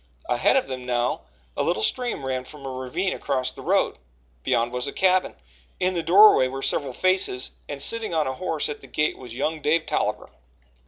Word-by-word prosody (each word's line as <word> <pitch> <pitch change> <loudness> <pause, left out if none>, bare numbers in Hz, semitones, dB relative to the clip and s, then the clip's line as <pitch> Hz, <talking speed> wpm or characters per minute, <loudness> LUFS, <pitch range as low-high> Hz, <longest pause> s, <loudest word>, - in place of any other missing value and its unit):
Ahead - - +2
of 265 - +3
them 130 -1 -6
now, 120 0 -1 0.3
a - - -1
little 110 - 0
stream 245 - -1
ran 130 -1 -2
from 140 +1 -12
a 135 - -4
ravine 130 +9 -2
across 130 -2 -2
the - - -12
road. - - +1 0.4
Beyond 115 - +1
was 125 0 -3
a - - -3
cabin; 185 +2 +2 0.4
in 185 0 +1
the 170 - -1
doorway 180 -4 +7
were 135 +1 -6
several 140 -3 0
faces, 185 -5 +1 0.2
and 145 - -5
sitting 225 +8 +1
on 160 -2 +1
a 130 - -2
horse 160 +1 -2
at 150 -1 -6
the - - -13
gate 150 0 0
was 120 -3 -9
young 155 +4 -2
Dave 155 +2 +2
Tolliver. - - -2
145 Hz, 200 wpm, -24 LUFS, 130-185 Hz, 0.4 s, doorway